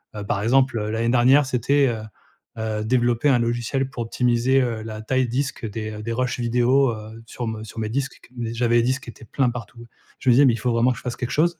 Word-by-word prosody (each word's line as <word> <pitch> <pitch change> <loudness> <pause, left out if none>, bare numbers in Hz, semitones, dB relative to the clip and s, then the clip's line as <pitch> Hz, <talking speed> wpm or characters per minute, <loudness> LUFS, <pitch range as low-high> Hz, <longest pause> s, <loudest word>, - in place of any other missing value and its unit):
heu, 105 - -5
par 100 -1 -1
exemple, 130 +1 +3
l'année 110 +2 -1
dernière, 130 +4 +5
c'était, 135 +2 +2
heu 115 -2 -3 0.6
heu, 110 -1 -2
développer 120 +2 +2
un 130 -3 +4
logiciel 120 +3 -1
pour 120 -3 -4
optimiser, 125 +3 +2
heu, 115 -3 -2
la 110 -1 -7
taille 130 +3 0
disque 130 -1 -2
des 110 0 -5
des 115 +1 -3
rushs 125 0 -1
vidéos, 125 +2 +3
heu, 110 +1 -9
sur 120 - -5
me 110 -1 -4
sur 110 - -9
mes 110 -1 -2
disques, 135 +3 -3
qu 125 - -20
qu 115 -2 -4
j'avais 120 0 +2
des 120 - +3
disques 130 +3 -1
qui - - -8
étaient 115 - -15
pleins 130 +4 0
partout. 120 0 -9 0.3
Je 130 - 0
me - - +7
disais: 140 +4 +6
«Mais 125 - +5
il - - -2
faut 120 +3 0
vraiment 115 +2 +3
que 125 - -4
je - - -11
fasse 125 -1 -4
quelque 125 -1 -4
chose!» 170 +2 +1
120 Hz, 250 wpm, -23 LUFS, 115-130 Hz, 0.6 s, me